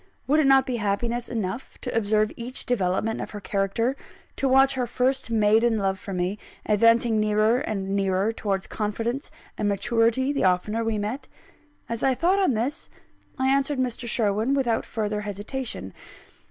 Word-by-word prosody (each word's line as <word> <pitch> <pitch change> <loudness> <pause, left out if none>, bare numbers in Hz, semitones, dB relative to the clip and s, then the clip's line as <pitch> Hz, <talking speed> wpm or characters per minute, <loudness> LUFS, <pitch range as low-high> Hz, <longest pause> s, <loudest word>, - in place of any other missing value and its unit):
Would 300 +3 +3
it 295 - +3
not 270 -1 +6
be 250 -2 -2
happiness 230 +3 -1
enough 220 +1 -4
to 250 - -4
observe 215 -1 +2
each 245 +2 -6
development 220 -1 0
of - - -5
her 210 - -7
character, 200 +6 -1 0.4
to 270 - 0
watch 270 +1 +5
her 255 -2 -1
first 260 0 0
maiden 225 +1 +3
love 195 -2 -1
for 200 - -8
me, 185 +2 -2 0.3
advancing 230 +1 +4
nearer 215 +3 +3
and 195 -4 -3
nearer 195 +1 +1
towards 200 -4 -2
confidence 225 +6 -3 0.3
and 210 - +1
maturity 230 +6 +1
the 280 - 0
oftener 190 +5 +1
we 225 -1 -1
met? 215 +7 -4 0.6
As 230 0 -3
I 265 -1 +2
thought 365 +8 +2
on 370 - +2
this, 260 +9 -2 0.5
I 260 0 +1
answered 275 +1 +1
Mr. 245 -2 -2
Sherwin 220 +3 +1
without 240 -5 0
further 210 -1 -2
hesitation. 210 - -5
225 Hz, 165 wpm, -25 LUFS, 205-255 Hz, 0.6 s, not